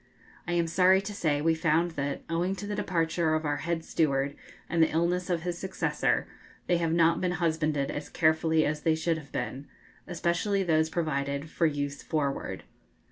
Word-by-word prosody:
I 175 - -1
am 170 -1 +2
sorry 185 +3 +4
to 200 +2 -6
say 150 -7 0
we 165 0 +4
found 165 +1 +1
that, 140 -3 -3
owing 175 +3 0
to 200 - -6
the 205 - -3
departure 165 -4 0
of 155 0 -2
our 145 0 0
head 165 0 -2
steward 140 -2 0 0.3
and 170 -1 +1
the 160 - +5
illness 175 +3 0
of 170 -2 0
his 175 -1 -3
successor, 190 0 0 0.4
they 175 - +2
have 165 -1 0
not 165 0 +3
been 180 -1 0
husbanded 155 -4 0
as 145 - -5
carefully 160 -1 +2
as 150 0 -1
they 160 0 +2
should 160 0 0
have 145 -3 -14
been, 140 +2 -4 0.4
especially 180 +4 0
those 160 -2 +2
provided 140 -2 -2
for 165 - +2
use 145 -1 -3
forward. 145 -3 -2
165 Hz, 185 wpm, -28 LUFS, 155-175 Hz, 0.4 s, the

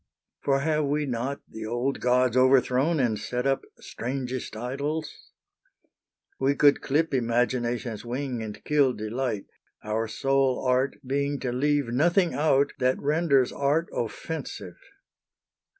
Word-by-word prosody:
For 135 -1 +1
have 155 0 +1
we 145 +1 0
not 130 +2 -3
the 110 -1 -7
old 120 +4 -1
gods 125 -1 +2
overthrown 130 +4 +3
And 115 -5 +1
set 125 +4 -3
up 135 0 +2 0.2
strangest 125 -2 -5
idols? 140 +6 -4 1.1
We 135 +1 +2
could 145 0 +5
clip 155 +3 0
Imagination's 120 -2 0
wing 125 0 -3
and 105 -2 -7
kill 145 -4 +3
delight, 110 0 -3 0.4
Our 110 +1 -1
sole 135 +2 +1
art 130 +2 +2
being 140 +2 -1
to 125 - -2
leave 145 +1 +1
nothing 170 +8 +2
out 145 -1 +2
That 130 0 +2
renders 145 -3 +2
art 145 +4 0
offensive. 155 +7 -5
130 Hz, 125 wpm, -26 LUFS, 120-145 Hz, 1.1 s, could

